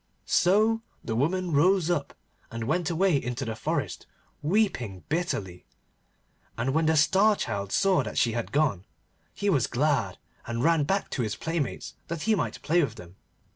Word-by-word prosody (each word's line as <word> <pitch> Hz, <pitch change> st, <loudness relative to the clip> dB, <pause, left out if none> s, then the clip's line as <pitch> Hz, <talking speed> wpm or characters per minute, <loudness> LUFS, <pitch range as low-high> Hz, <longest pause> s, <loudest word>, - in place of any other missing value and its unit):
So 215 Hz, +5 st, +3 dB, 0.2 s
the 110 Hz, -, -3 dB
woman 175 Hz, +8 st, 0 dB
rose 175 Hz, +3 st, +3 dB
up, 145 Hz, -5 st, -2 dB, 0.3 s
and 115 Hz, 0 st, -5 dB
went 165 Hz, +8 st, 0 dB
away 175 Hz, -3 st, +2 dB
into 125 Hz, +2 st, -3 dB
the 110 Hz, -1 st, -4 dB
forest 110 Hz, -, -3 dB, 0.3 s
weeping 145 Hz, -, 0 dB
bitterly, 105 Hz, -, -3 dB, 0.9 s
and 125 Hz, +3 st, -1 dB
when 160 Hz, +1 st, +2 dB
the 160 Hz, 0 st, +3 dB
Star 200 Hz, +8 st, +4 dB
Child 100 Hz, -, -3 dB
saw 195 Hz, -2 st, +3 dB
that -, -, -6 dB
she 115 Hz, -, +3 dB
had 115 Hz, 0 st, -3 dB
gone, 135 Hz, -, +1 dB, 0.5 s
he 205 Hz, -, -4 dB
was 145 Hz, -, +3 dB
glad, 125 Hz, -, 0 dB, 0.3 s
and 115 Hz, +1 st, -2 dB
ran 165 Hz, -2 st, +3 dB
back 195 Hz, +5 st, -1 dB
to 130 Hz, -, -1 dB
his 110 Hz, -2 st, -2 dB
playmates 165 Hz, -6 st, -3 dB
that 170 Hz, -2 st, -4 dB
he 220 Hz, -, +3 dB
might 200 Hz, -, -2 dB
play 170 Hz, +2 st, +3 dB
with 115 Hz, -6 st, -3 dB
them. 90 Hz, -2 st, -12 dB
150 Hz, 170 wpm, -27 LUFS, 115-180 Hz, 0.9 s, Star